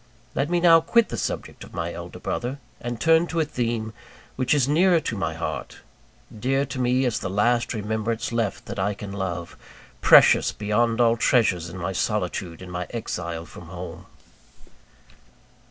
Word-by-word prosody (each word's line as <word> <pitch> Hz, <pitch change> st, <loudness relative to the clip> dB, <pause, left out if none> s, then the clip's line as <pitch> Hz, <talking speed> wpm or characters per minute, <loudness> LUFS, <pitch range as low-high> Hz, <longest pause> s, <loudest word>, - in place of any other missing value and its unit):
Let 140 Hz, +3 st, -1 dB
me 175 Hz, 0 st, +2 dB
now 165 Hz, -1 st, +7 dB
quit 230 Hz, +7 st, +3 dB
the -, -, -4 dB
subject -, -, -4 dB
of -, -, -13 dB
my -, -, -3 dB
elder -, -, -8 dB
brother, 125 Hz, +3 st, -3 dB, 0.2 s
and 120 Hz, -1 st, -5 dB
turn 165 Hz, +4 st, +4 dB
to 170 Hz, -, -2 dB
a 160 Hz, -, +2 dB
theme 115 Hz, -5 st, -2 dB, 0.4 s
which 130 Hz, -1 st, -1 dB
is 135 Hz, -3 st, +2 dB
nearer 170 Hz, +4 st, +4 dB
to 115 Hz, -, -3 dB
my 85 Hz, -5 st, -2 dB
heart; 80 Hz, -, -5 dB, 0.6 s
dear 135 Hz, +4 st, +1 dB
to 130 Hz, -1 st, -6 dB
me 125 Hz, +1 st, +2 dB
as 120 Hz, -, 0 dB
the 95 Hz, -, -4 dB
last 120 Hz, +5 st, +1 dB
remembrance 110 Hz, +2 st, -2 dB
left 115 Hz, -4 st, -2 dB
that -, -, -6 dB
I 100 Hz, +1 st, 0 dB
can 100 Hz, 0 st, -7 dB
love; 90 Hz, -3 st, -4 dB, 0.5 s
precious -, -, +7 dB
beyond 115 Hz, +3 st, 0 dB
all 115 Hz, -1 st, +4 dB
treasures 95 Hz, -9 st, +2 dB
in 90 Hz, -, -8 dB
my 90 Hz, +1 st, -3 dB
solitude 90 Hz, -3 st, -2 dB
and 90 Hz, -, -9 dB
my 90 Hz, 0 st, -4 dB
exile 85 Hz, -8 st, -4 dB
from 85 Hz, -, -12 dB
home. 90 Hz, 0 st, -8 dB
115 Hz, 170 wpm, -24 LUFS, 95-130 Hz, 0.6 s, now